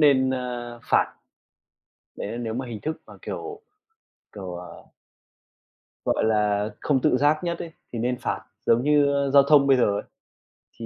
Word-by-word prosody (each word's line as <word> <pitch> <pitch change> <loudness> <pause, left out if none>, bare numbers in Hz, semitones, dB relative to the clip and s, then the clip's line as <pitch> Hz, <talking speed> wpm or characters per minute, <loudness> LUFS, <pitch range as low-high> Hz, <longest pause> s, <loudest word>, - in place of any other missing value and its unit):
nên, 135 -3 +5
ơ, 120 -2 -4
phạt. - - +3 1.0
Đấy - - -5
là 115 - -4
nếu 115 -2 -3
mà 130 +2 -3
hình 115 -3 -6
thức 155 0 -4
mà - - -12
kiểu 425 +1 -6 0.7
kiểu, 95 -4 -7
ờ 90 0 -10 1.2
gọi - - +1
là, 105 -1 +2
không 135 -3 +2
tự 125 - +3
giác 150 +4 +2
nhất 170 -1 -2
ấy, 165 - -6 0.2
thì 115 - -3
nên 125 +2 0
phạt - - -2 0.2
giống 115 +2 +4
như 145 0 +4 0.3
giao 140 -1 +8
thông 140 -1 +5
bây 135 - +5
giờ 125 - +4
ấy, - - -4 0.8
thì 115 - -5
125 Hz, 170 wpm, -25 LUFS, 115-145 Hz, 1.2 s, giao